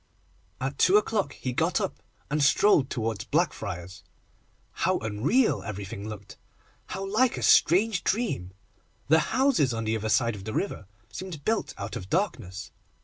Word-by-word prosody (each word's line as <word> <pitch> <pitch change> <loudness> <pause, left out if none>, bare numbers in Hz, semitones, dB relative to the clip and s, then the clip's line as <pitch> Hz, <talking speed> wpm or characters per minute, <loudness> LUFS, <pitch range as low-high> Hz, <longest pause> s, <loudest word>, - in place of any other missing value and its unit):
At 135 +2 -4
two 190 +3 +6
o'clock 210 -1 0
he 125 - -4
got - - +1
up, - - -4 0.3
and 150 0 +1
strolled 145 -2 +4
towards 110 -4 -2
Blackfriars. 100 - -2 0.7
How - - 0
unreal 110 - +1
everything 100 +1 -6
looked! 105 -2 -9 0.5
How 195 - -4
like 235 +5 +2
a - - -4
strange 195 +2 +4
dream! 200 - -1 0.6
The 160 +1 +6
houses 245 - +2
on 115 - -2
the 110 0 0
other 110 0 -3
side 115 +1 +2
of 95 - -9
the 110 - -4
river 195 - -3 0.2
seemed 160 - -7
built 225 0 -1
out 100 +1 -5
of 95 - -7
darkness. 115 - -2
130 Hz, 150 wpm, -27 LUFS, -, 0.7 s, two